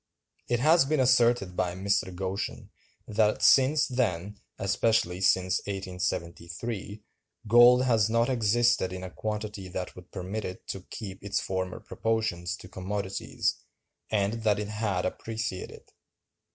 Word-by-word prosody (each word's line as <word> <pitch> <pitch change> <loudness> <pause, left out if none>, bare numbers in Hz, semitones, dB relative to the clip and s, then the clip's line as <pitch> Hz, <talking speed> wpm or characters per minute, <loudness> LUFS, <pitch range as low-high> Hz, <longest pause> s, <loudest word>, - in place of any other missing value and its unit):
It 120 - +1
has 160 +2 +6
been 155 +1 +1
asserted 120 -7 +3
by 90 -1 -1
Mr. 95 -1 0
Goschen 95 +2 -4 0.4
that 105 0 +1
since 140 +3 +5
then, 105 -6 -1 0.2
especially 100 -2 +1
since 95 -1 +3
1873, 95 +2 -4 0.4
gold 120 +2 +7
has 115 -4 +3
not 115 +1 +2
existed 120 -4 +2
in 95 0 -6
a 90 - -7
quantity 105 0 -4
that 90 0 -5
would 90 - -13
permit 100 +3 -4
it 90 -1 -7
to 95 -1 -6
keep 95 -3 -8
its 100 - -1
former 95 -1 -3
proportions 100 -6 -2
to 95 - -12
commodities, 95 +1 -2 0.5
and 105 +2 0
that 105 -2 +3
it 105 0 -4
had 105 -4 -1
appreciated. 110 -1 -5
100 Hz, 130 wpm, -28 LUFS, 95-115 Hz, 0.5 s, gold